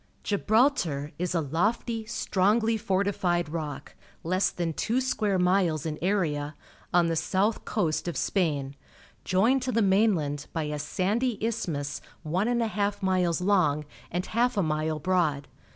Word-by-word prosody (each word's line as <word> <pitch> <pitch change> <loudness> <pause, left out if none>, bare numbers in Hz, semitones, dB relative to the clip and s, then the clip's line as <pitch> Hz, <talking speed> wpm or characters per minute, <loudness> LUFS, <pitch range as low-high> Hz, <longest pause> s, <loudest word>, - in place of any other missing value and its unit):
— - - -36
Gibraltar 205 - +2
is 180 0 -1
a 165 - +2
lofty, 215 - -1
strongly 220 +2 +1
fortified 190 -5 0
rock, 155 -2 -5 0.3
less 185 +3 +1
than 170 -2 -3
two 235 +10 0
square 215 -6 0
miles 180 -4 +2
in 155 -1 -3
area, 155 -6 0 0.4
on 175 -1 +4
the 165 0 0
south 200 +6 0
coast 160 0 -1
of 170 - -3
Spain, 145 -8 0 0.5
joined 230 +9 +3
to 255 0 -2
the 230 -2 +2
mainland 190 -8 +2
by 160 - -1
a 150 0 -3
sandy 210 - 0
isthmus 170 -11 -2 0.2
one 180 +7 0
and 240 -1 +1
a - - 0
half 205 -2 -2
miles 180 -3 +1
long 180 -7 +2 0.2
and 180 +2 -2
half 240 +1 +1
a 200 - +3
mile 155 0 -1
broad. 155 -4 0
185 Hz, 150 wpm, -27 LUFS, 155-210 Hz, 0.5 s, on